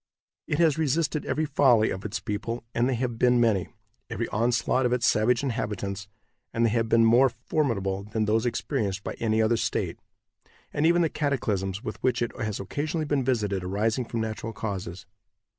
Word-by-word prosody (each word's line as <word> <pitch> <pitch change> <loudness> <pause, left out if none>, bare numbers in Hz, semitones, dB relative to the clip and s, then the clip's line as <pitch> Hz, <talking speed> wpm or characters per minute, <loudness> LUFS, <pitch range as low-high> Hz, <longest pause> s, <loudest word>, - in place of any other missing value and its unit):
It 145 - 0
has 160 -2 +3
resisted 155 0 0
every 155 - 0
folly 130 -6 +4
of 95 - -5
its 105 +1 -3
people, 115 +3 -4
and 120 +2 +2
they 130 - +1
have 120 -1 -3
been 125 -1 +4
many; 110 -6 +2 0.4
every - - -2
onslaught 120 +3 +1
of 120 - 0
its 120 -2 +1
savage 115 +3 +3
inhabitants, 105 -5 -3 0.4
and 115 +1 +1
they 115 - +2
have 115 0 0
been 115 0 +5
more 120 +4 +6
formidable 110 -7 -1
than 110 +1 -1
those 110 +3 +1
experienced 110 -5 -2
by - - -4
any 110 -1 +2
other 115 +1 +2
state; - - -2 0.7
and 150 +2 +2
even 175 +1 +4
the - - +3
cataclysms 105 -10 -1
with - - -6
which 125 -2 +1
it 120 - -4
has 110 -2 -3
occasionally 150 - -2
been 145 -2 0
visited 105 -7 0
arising 110 +6 0
from 115 0 -3
natural 110 0 -4
causes. 95 -4 -5
115 Hz, 180 wpm, -26 LUFS, 105-130 Hz, 0.7 s, more